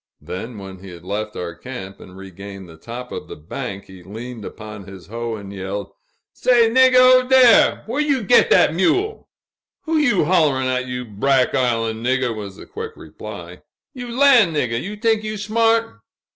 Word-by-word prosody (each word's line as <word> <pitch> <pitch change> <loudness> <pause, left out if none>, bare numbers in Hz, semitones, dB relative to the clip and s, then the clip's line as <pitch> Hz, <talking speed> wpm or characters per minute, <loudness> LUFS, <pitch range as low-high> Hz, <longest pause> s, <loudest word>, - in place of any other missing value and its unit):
Then, 110 +5 -7
when 95 -1 -9
he 95 +1 -11
had 85 -1 -12
left 105 +3 -4
our 85 -1 -5
camp 100 -2 -9
and 95 0 -13
regained 95 0 -10
the 80 - -13
top 120 +9 -9
of - - -6
the - - -8
bank, 100 - -7
he 95 -1 -14
leaned 110 +5 -9
upon 105 -1 -9
his 95 -2 -11
hoe 115 +2 -5
and 100 -2 -9
yelled: 100 +1 -5 0.4
"Say, 235 -3 +3
niggah, 260 +1 +5
ober 255 0 +6
dere! 255 -3 +5
whar 245 +7 -2
you 280 -5 0
git 195 - +4
dat - - +4
mule?" 380 - 0 0.5
"Who 320 0 0
you 245 - +2
holl'rin' 150 -6 +2
at, 130 0 -1
you 125 0 -5
brack 125 +5 +1
island 115 -3 0
niggah?" 125 -2 0
was 100 -3 -7
the - - -12
quick 450 +1 -7
reply. - - -10 0.3
"You 245 -2 -7
lan' 245 - +5
niggah, 120 -6 -1
you 205 +2 -6
tink 220 0 +1
you 215 0 -5
smart!" 225 +2 +1
125 Hz, 180 wpm, -20 LUFS, -, 0.5 s, ober